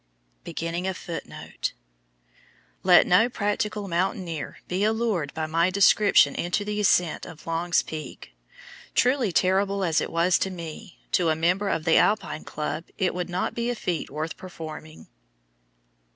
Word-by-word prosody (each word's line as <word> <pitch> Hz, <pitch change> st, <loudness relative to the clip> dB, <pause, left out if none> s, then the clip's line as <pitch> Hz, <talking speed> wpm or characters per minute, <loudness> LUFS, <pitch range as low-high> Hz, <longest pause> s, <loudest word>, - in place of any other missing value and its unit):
Let 180 Hz, -1 st, +7 dB
no 220 Hz, +7 st, +4 dB
practical 210 Hz, -1 st, -2 dB
mountaineer 175 Hz, -3 st, -2 dB
be 185 Hz, +3 st, -1 dB
allured 215 Hz, -9 st, 0 dB
by 160 Hz, -, -1 dB
my 165 Hz, +3 st, +2 dB
description 200 Hz, -5 st, +5 dB
into 180 Hz, +4 st, -1 dB
the 210 Hz, 0 st, -2 dB
ascent 180 Hz, -5 st, +2 dB
of 165 Hz, -3 st, -12 dB
Long's 165 Hz, +1 st, +1 dB
Peak. 155 Hz, -, -8 dB, 0.6 s
Truly 250 Hz, -4 st, +2 dB
terrible 195 Hz, +2 st, +2 dB
as 165 Hz, -3 st, +2 dB
it -, -, -4 dB
was 170 Hz, +2 st, +3 dB
to 190 Hz, -, 0 dB
me, 175 Hz, +2 st, -8 dB
to 175 Hz, -3 st, +2 dB
a 155 Hz, -, +2 dB
member 180 Hz, +5 st, +1 dB
of 160 Hz, -, -1 dB
the 165 Hz, -, +5 dB
Alpine 210 Hz, -6 st, +1 dB
Club 155 Hz, +2 st, -4 dB
it 185 Hz, -, +1 dB
would 180 Hz, 0 st, -3 dB
not 180 Hz, +1 st, -2 dB
be 235 Hz, 0 st, -2 dB
a 245 Hz, -, -1 dB
feat 180 Hz, -7 st, -3 dB
worth 155 Hz, +3 st, -4 dB
performing. 160 Hz, -3 st, -9 dB
180 Hz, 135 wpm, -25 LUFS, 165-200 Hz, 0.6 s, Let